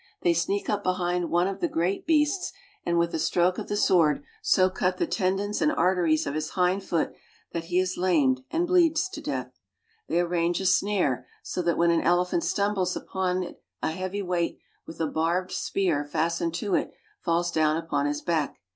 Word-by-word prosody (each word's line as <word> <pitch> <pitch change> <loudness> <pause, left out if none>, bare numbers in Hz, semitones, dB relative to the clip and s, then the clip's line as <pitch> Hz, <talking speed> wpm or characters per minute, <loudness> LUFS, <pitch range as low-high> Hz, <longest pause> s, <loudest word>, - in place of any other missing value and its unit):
They 175 - +4
sneak 175 +4 -1
up 205 -1 0
behind 180 -1 0
one 175 +2 +2
of 195 0 -4
the - - +1
I - - -14
great 175 - -1
beasts, 315 +4 +2 0.3
and 170 0 0
with 170 0 +1
a 160 - -1
stroke 180 +3 +2
of - - -6
the 205 - -1
sword 160 -8 +3 0.2
so 185 -1 +4
cut 185 0 -1
the - - +1
tendons 195 +1 -1
and 300 - +3
arteries 175 - +2
of 140 - -3
his 155 +1 -2
hind 185 +2 +2
foot 170 -4 -1 0.4
that 165 -1 -4
he 175 +1 -1
is 185 0 +1
lamed 150 -8 +3
iand 340 +2 +1
bleeds 345 0 +3
to 395 - -7
death. - - -4 0.5
They 170 - +1
arrange 175 0 +1
a 190 - -3
snare, 190 -8 +1 0.2
so 180 - -3
that 170 -1 0
when 170 0 +4
an 170 - +2
elephant 180 - +2
stumbles 200 - 0
upon 185 -1 -1
it 175 - -10 0.2
a - - +1
heavy 185 +4 -3
weight 175 -2 -1 0.3
with 165 - -10
a 165 - +1
barbed 165 +4 0
spear 175 -7 0
fastened 165 +2 -1
to 195 +2 -2
it - - +1 0.3
falls 175 0 0
down 155 -1 +2
upon 145 -3 -1
his 145 0 -3
back. 160 -5 -1
180 Hz, 200 wpm, -26 LUFS, 165-190 Hz, 0.5 s, They